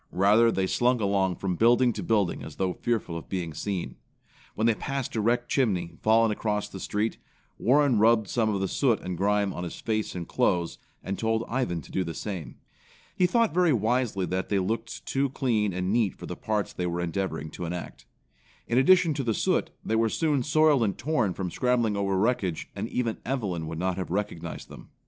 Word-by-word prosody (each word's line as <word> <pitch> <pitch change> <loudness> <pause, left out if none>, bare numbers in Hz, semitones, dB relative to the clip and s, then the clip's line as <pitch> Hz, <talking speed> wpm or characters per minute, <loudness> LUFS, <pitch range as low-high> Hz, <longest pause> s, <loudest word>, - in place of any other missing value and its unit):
Rather, 105 +5 +4
they 95 -3 0
slunk 125 +5 +2
along 100 -3 +1
from 95 -1 -2
building 120 +3 +4
to - - -5
building 105 -6 +1
as 75 - -9
though 95 -1 -1
fearful 110 -7 -2
of 85 - -7
being 90 -4 -3
seen. 95 +3 -4 0.6
When 110 - 0
they 115 - +5
passed 135 +3 -4
a 110 - +1
wrecked 120 +3 +1
chimney, 95 -11 0
fallen 110 0 +4
across 105 -1 -1
the 95 - -9
street, 105 +4 -2 0.4
Warren 135 -2 +3
rubbed 110 -1 +4
some 115 0 +1
of 100 -2 0
the 95 - 0
soot 120 0 +1
and 90 0 -4
grime 100 +1 +1
on 90 - -5
his 85 - -6
face 110 -3 -2
and 85 -2 -5
clothes, 85 -1 0 0.2
and 95 0 -4
told 110 0 0
Ivan 115 -10 -1
to - - -14
do 95 - 0
the 85 -2 -5
same. 90 - -5 0.6
He 180 - +3
thought 230 +2 +2
very 175 -3 +4
wisely 115 -3 +1
that 95 +2 -2
they 100 - +2
looked 115 +5 -3
too 135 +1 0
clean 115 -6 0
and 90 +2 -1
neat 110 -5 +1
for - - -9
the - - -5
parts 105 -2 -2
they 90 - -2
were 85 0 -2
endeavoring 85 -3 -3
to 90 - -6
enact. 85 -7 -6 0.6
In 120 - +2
addition 170 +3 +5
to 140 -1 -2
the 115 -3 0
soot, - - +1 0.2
they 110 - 0
were 115 0 +3
soon 150 +1 +1
soiled 150 0 +4
and 100 -4 0
torn 120 - 0
from 90 -3 -3
scrambling 120 -2 +1
over 100 -1 0
wreckage 95 -5 0
and - - -4
even 115 -3 -2
Evelyn 100 -11 -2
would 80 0 -5
not 90 +1 -1
have 95 - -4
recognized 100 -2 -4
them. - - -12
105 Hz, 205 wpm, -27 LUFS, 95-120 Hz, 0.6 s, they